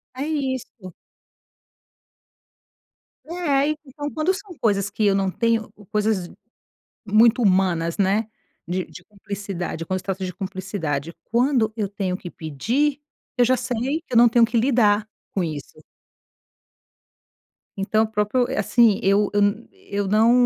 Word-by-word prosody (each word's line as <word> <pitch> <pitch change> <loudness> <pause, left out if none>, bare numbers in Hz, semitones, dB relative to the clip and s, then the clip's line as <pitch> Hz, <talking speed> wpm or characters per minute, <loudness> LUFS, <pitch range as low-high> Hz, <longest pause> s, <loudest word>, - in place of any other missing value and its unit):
É 265 - -3
isso. 260 - -4 2.3
É, 335 - -7 0.2
aí 285 +3 +2
Então 290 +2 -6
quando 320 +5 +1
são 400 -1 -8
coisas 200 -3 +1
que 210 +1 -1
eu 200 -1 +4
não 195 -1 +1
tenho 230 0 0 0.2
coisas 210 -4 0 0.8
muito 220 +3 +4
humanas, 185 -5 +2
né, 200 +3 +2 0.4
de 180 +1 -1
de 180 - -13
cumplicidade, 195 -4 -6
quando 185 +2 -2
se - - -13
trata 190 -1 -3
de 185 - -5
cumplicidade, 185 -6 -4 0.2
quando 235 -3 +2
eu 210 -3 -1
tenho 190 -2 -2
que 180 - -8
pedir, 240 - -1 0.4
eu 245 - +5
já 255 +1 +3
sei 255 +5 -2
que 295 - -12
eu - - +4
não 240 0 +7
tenho 230 0 +5
que 235 +1 -1
lidar 220 -4 +3 0.3
com 190 - 0
isso. 155 -4 -6 2.0
Então 205 +3 +2
o 225 - -1
próprio 220 +4 +1
eh, - - -3
assim, 215 0 +4
eu 200 +1 +3
eu 205 - +3
n 205 +3 +1
eu 200 -1 -4
não 220 +3 +4
210 Hz, 145 wpm, -23 LUFS, 190-240 Hz, 2.3 s, não